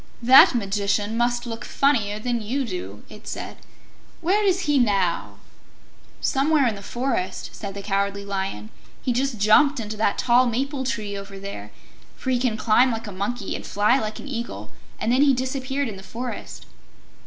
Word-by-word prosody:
"That 255 +1 +8
Magician 205 0 0
must 240 +1 0
look 230 -1 -6
funnier 225 -8 +1
than 235 +1 -2
you 255 +6 -2
do," 105 - -6
it 210 - -13
said. - - -6 0.6
"Where 385 +5 +2
is 380 -2 +2
he 295 -4 +2
now?" 180 - +1 0.8
"Somewhere 280 +1 +2
in 235 - +2
the 200 - -9
forest," 220 -4 -3
said 200 -2 -7
the 200 - -6
Cowardly 200 0 -1
Lion. 190 - -4 0.3
"He 250 - +1
just 260 0 -1
jumped 250 +8 +4
into 215 -1 -5
that 210 -1 +1
tall 250 +1 +4
maple 265 +4 -1
tree 215 -5 -3
over 200 0 -8
there, 195 - -7 0.5
for 260 - -3
he 250 - +2
can 240 -3 0
climb 240 +4 +4
like 225 0 -4
a 205 - -6
monkey 200 +3 -3
and - - -6
fly 210 +6 +2
like 215 -2 -4
an - - -9
eagle, 230 - -5 0.3
and 225 - 0
then 255 +2 +4
he 285 -1 +5
disappeared 260 +2 -2
in 210 -4 -6
the - - -10
forest." 240 +5 -7
225 Hz, 175 wpm, -23 LUFS, 200-260 Hz, 0.8 s, That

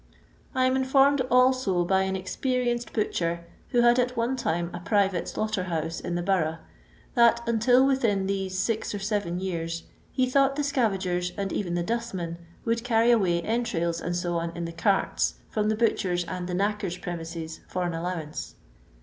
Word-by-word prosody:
I 255 0 +3
am 255 0 +2
informed 270 +1 +4
also 250 -8 +3
by 190 +2 +3
an 190 0 -1
ex 185 0 -6
perienced 245 -2 -1
hutchor, 170 -5 -1 0.2
who 240 - +3
had 240 +1 +5
at 250 0 0
one 235 +3 +1
time 170 -8 -1
a 175 - -5
private 195 -1 +1
slaughter 215 -4 -2
house 165 -2 -2
in 175 - -3
the 175 - -1
Borou;»h, 170 -4 +1 0.6
that, 235 -1 +4
until 245 +3 +4
within 230 -8 +2
these 190 -1 -2
six 215 +2 -1
or - - -1
seven 200 -3 -1
years, 165 -3 -3 0.3
he 255 - +2
thought 275 +1 +3
the 295 - -1
sca 275 -5 +2
vagers, 180 -2 -2
and 195 -1 -2
even 175 -4 -1
the 175 - 0
dustmen, 185 -6 -3 0.3
would 230 0 0
carry 235 -1 +4
away 180 -7 +2
entrails, 195 -8 -1
&c., 175 +1 -2 0.3
in 170 0 -3
the 165 - -6
carts, 195 +3 +1 0.2
from 215 -1 +1
the 215 - +2
butcher's 185 -6 +1
and 180 +1 -4
the 180 - -2
knacker's 200 -2 -1
premises, 165 -2 -6
for 180 - -2
an 175 -1 -1
allowance. 165 -2 -4
195 Hz, 175 wpm, -27 LUFS, 175-235 Hz, 0.6 s, had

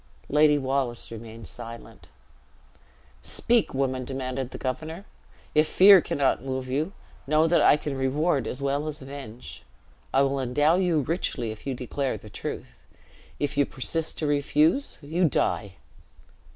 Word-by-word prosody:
Lady 150 0 +5
Wallace 130 -4 -2
remained 115 0 -9
silent. 115 -1 -10 1.1
"Speak, 235 -2 +1
woman," 130 -1 0
demanded 130 0 -4
the - - -8
governor. 155 +8 -4 0.5
"If 155 0 +4
fear 195 -1 +8
cannot 135 -4 0
move 130 -1 -3
you, 150 +9 -1 0.3
know 155 +2 +4
that 170 +1 +3
I - - +6
can 150 -2 -4
reward 140 +3 0
as 135 +2 -5
well 140 +2 0
as 150 -2 -5
avenge. 130 - -9 0.5
I 135 - +4
will 140 0 0
endow 145 +6 +2
you 175 -5 +2
richly, 135 -7 -2
if 110 +5 -10
you 135 - -1
declare 130 +2 -3
the 105 - -13
truth. - - -7 0.6
If 145 0 -2
you 145 - +5
persist 160 +5 -1
to 155 - -2
refuse, 150 - +2
you 165 +3 +1
die." 100 -6 0
140 Hz, 145 wpm, -26 LUFS, 130-155 Hz, 1.1 s, fear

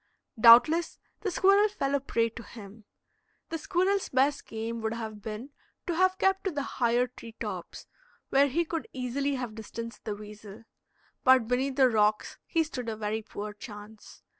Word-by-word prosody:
Doubtless 250 +9 +7 0.2
the 405 - -2
squirrel 395 +3 +4
fell 275 -9 -2
a 280 - +3
prey 230 -4 0
to 235 +1 -10
him. 215 -2 -12 0.6
The 325 - -3
squirrel's 380 +4 0
best 270 +2 +1
game 225 +1 -4
would 220 +1 -2
have 220 -2 -6
been 220 +6 -7 0.3
to 350 - -1
have 370 +2 +3
kept 385 +1 +1
to 385 - 0
the 290 -3 -2
higher 245 -2 +1
tree 240 -2 -12
tops, - - -6 0.4
where 275 +1 +4
he 335 +6 0
could 325 0 -4
easily 270 +2 -1
have 250 -4 -4
distanced 230 +1 -8
the 210 - -3
weasel. 210 +1 -11 0.6
But 260 -4 +5
beneath 260 +2 0
the 265 -1 +5
rocks 215 -2 +1
he 330 - +2
stood 250 -7 -5
a 220 - -3
very 215 +1 -2
poor 210 -1 -7
chance. 210 0 -12
245 Hz, 170 wpm, -28 LUFS, 220-290 Hz, 0.6 s, Doubtless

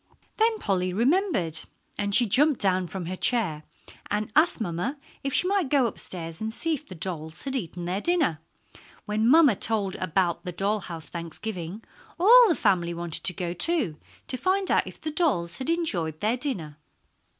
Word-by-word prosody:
Then 445 0 +3
Polly 185 - -1
remembered, 235 - +1 0.4
and 205 -1 +2
she 245 - +7
jumped 270 +6 +3
down 185 -2 +1
from 180 +1 -6
her 185 +2 -4
chair 185 -9 0 0.5
and 210 +1 -2
asked 310 0 +4
mamma 215 - -3 0.3
if 275 - -2
she 360 - +3
might 385 -7 +1
go 275 -3 +3
upstairs 165 -6 -6
and 220 0 -2
see 325 +8 -2
if 295 - -5
the 185 - -9
dolls 160 -1 -4
had 275 -1 -3
eaten 175 -6 -4
their 185 +3 -2
dinner. 320 - +1 0.7
When 215 +2 +1
mamma 295 -5 +6
told 205 -2 0
about 185 -1 0
the 180 - -4
doll 200 +4 0
house 165 -4 -8
Thanksgiving, 170 +4 -6 0.4
all 475 +7 +8
the 335 - +3
family 170 -6 +1
wanted 170 -1 -3
to 180 - +4
go, 175 -1 -3
too, 215 - +1 0.3
to 255 - -2
find 375 +8 0
out - - +2
if - - -10
the 310 - -4
dolls 265 - 0
had 265 - -3
enjoyed 180 - -1
their 215 +3 +1
dinner. 180 - -4
205 Hz, 180 wpm, -26 LUFS, 175-280 Hz, 0.7 s, all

